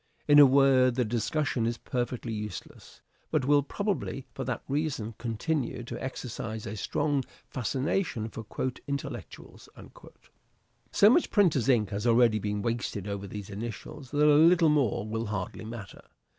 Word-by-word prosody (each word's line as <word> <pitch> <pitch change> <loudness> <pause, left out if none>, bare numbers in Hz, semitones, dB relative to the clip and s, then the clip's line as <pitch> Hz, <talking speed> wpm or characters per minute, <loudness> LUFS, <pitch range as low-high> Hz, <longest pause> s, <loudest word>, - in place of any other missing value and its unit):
In 145 0 +7
a 145 - +10
word, 130 -2 +4
the 125 -1 +1
discussion 120 +2 -1
is 115 0 -2
perfectly 120 -1 -3
useless, 105 -3 -8 0.3
but - - 0
will 145 +1 +5
probably 185 -4 -3
for 135 - -4
that 125 -1 -3
reason 135 -6 -2
continue 120 +2 -2
to - - -7
exercise 115 -4 -5
a 105 - -5
strong 140 +6 0 0.3
fascination 135 - -1
for 115 0 -8 0.4
" - - -40
intellectuals." 140 -1 -7 1.2
So 200 - +6
much 335 - +3
printer's 155 - +3
ink 110 -6 +3
has 105 +3 -2
already 115 -2 +4
been 105 0 -2
wasted 115 -4 -2
over 100 0 -4
these 105 +1 -7
initials 120 +7 -7
that 145 +3 +2
a 150 - +6
little 170 -2 +5
more 135 -9 +1
will 110 +1 -3
hardly 105 +1 -4
matter. 110 -3 -8
120 Hz, 150 wpm, -28 LUFS, 110-145 Hz, 1.2 s, a